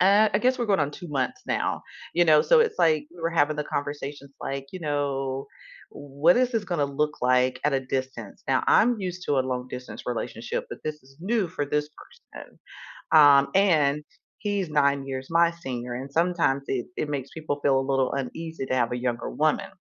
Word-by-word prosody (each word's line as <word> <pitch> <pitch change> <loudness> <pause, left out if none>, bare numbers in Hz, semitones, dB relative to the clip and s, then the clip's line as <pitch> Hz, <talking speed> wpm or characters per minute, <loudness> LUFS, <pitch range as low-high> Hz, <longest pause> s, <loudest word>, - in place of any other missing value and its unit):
uh, 200 +4 +5
I - - +5
guess 255 +1 +2
we're 240 - -1
going 195 -6 +2
on 145 0 0
2 175 +3 -9
months 135 -3 -2
now, - - -1 0.3
you 175 0 +4
know, 155 -2 +6
so - - +5
it's 460 - +1
like 155 -3 +3
we 170 - -13
were 165 +1 0
having 155 -2 +2
the 150 - -2
conversations 145 -1 -5
like, 135 0 -4
you 185 - -7
know, 135 -3 -2 0.4
"What 145 +4 +2
is 250 0 +3
this 225 -4 -1
gonna 175 -7 0
look 150 +1 -2
like 125 0 +2
at 150 - +2
a 135 - +1
distance?" 130 -5 -5
Now, - - +2
I'm 235 -1 +4
used 180 -1 -4
to 140 -2 +2
a - - +4
long-distance 125 0 -5
relationship, - - -3
but - - -7
this 155 -2 -4
is 135 +1 -21
new 215 +1 0
for 160 -4 -3
this 150 +1 -1 0.4
person, - - -12 0.5
um, 145 -3 +7
and 150 -7 +3 0.3
he's 200 -5 -2
9 140 -2 +2
years 130 0 -5
my 170 0 +4
senior, 125 -7 -6
and 135 +3 -7
sometimes 165 -5 +1
it 125 -2 -2
it 150 - -2
makes 140 -2 -4
people 155 -3 -4
feel 135 -2 +3
a - - -1
little 135 -1 +1
uneasy 140 +2 -4
to - - -1
have 120 -2 +1
a - - -1
younger 120 - -2
woman. - - 0
145 Hz, 205 wpm, -26 LUFS, 135-170 Hz, 0.5 s, um